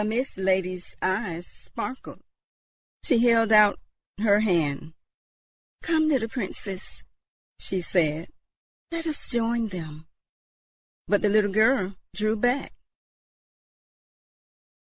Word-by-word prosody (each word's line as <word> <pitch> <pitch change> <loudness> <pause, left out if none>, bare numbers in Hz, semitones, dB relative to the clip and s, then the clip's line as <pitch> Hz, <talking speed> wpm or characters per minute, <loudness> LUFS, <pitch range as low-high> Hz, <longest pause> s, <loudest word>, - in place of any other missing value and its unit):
The - - -1
Mist 235 +5 -1
Lady's 185 -1 -1
eyes 185 -3 -2
sparkled; 255 +3 -8 0.8
she 255 -8 +3
held 230 -2 +4
out 210 -1 +6 0.4
her 205 -1 +4
hand; 160 -6 0 0.9
"Come, 315 -2 +2
little 265 -7 +2
Princess," 200 -4 -5 0.6
she 190 -1 -3
said, 160 -2 0 0.6
"let 335 0 -4
us 310 -3 -3
join 235 -1 0
them." 160 -5 -8 1.0
But 205 - +2
the 210 - +3
little 205 -1 +3
girl 215 -2 +3 0.2
drew 215 +3 +1
back. 245 +5 0
210 Hz, 100 wpm, -26 LUFS, 185-235 Hz, 1.0 s, out